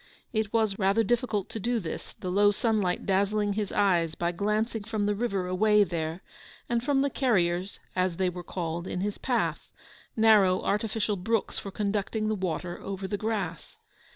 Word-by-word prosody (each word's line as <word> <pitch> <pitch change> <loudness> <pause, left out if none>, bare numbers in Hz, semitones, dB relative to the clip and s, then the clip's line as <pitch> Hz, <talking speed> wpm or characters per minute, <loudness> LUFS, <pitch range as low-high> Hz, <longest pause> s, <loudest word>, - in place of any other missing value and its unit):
It 220 -2 0
was 220 -3 +1
rather 200 +3 +3
difficult 230 -3 0
to 225 - -5
do 235 +3 0
this, 170 -6 -6
the 180 - -3
low 205 +2 +5
sunlight 205 -3 0
dazzling 200 +1 +1
his 205 -1 -2
eyes 175 -5 +2
by 170 0 0
glancing 210 +4 -1
from 215 -1 -2
the 205 - +2
river 200 -4 -1
away 210 +3 +4
there, 165 -1 -3 0.4
and 235 0 0
from 275 0 +2
the 280 - +2
'carriers' 185 -8 +1 0.2
(as 185 -2 0
they 190 - +1
were 180 0 -4
called) 170 0 -4
in 180 - -3
his 205 +1 -2
path—narrow 220 -5 +1
artificial 210 0 0
brooks 225 +4 -1
for 200 - -6
conducting 210 +2 -1
the - - +1
water 180 -2 -3
over 195 -1 -4
the 205 - -2
grass. 215 0 -3
205 Hz, 170 wpm, -28 LUFS, 185-220 Hz, 0.4 s, low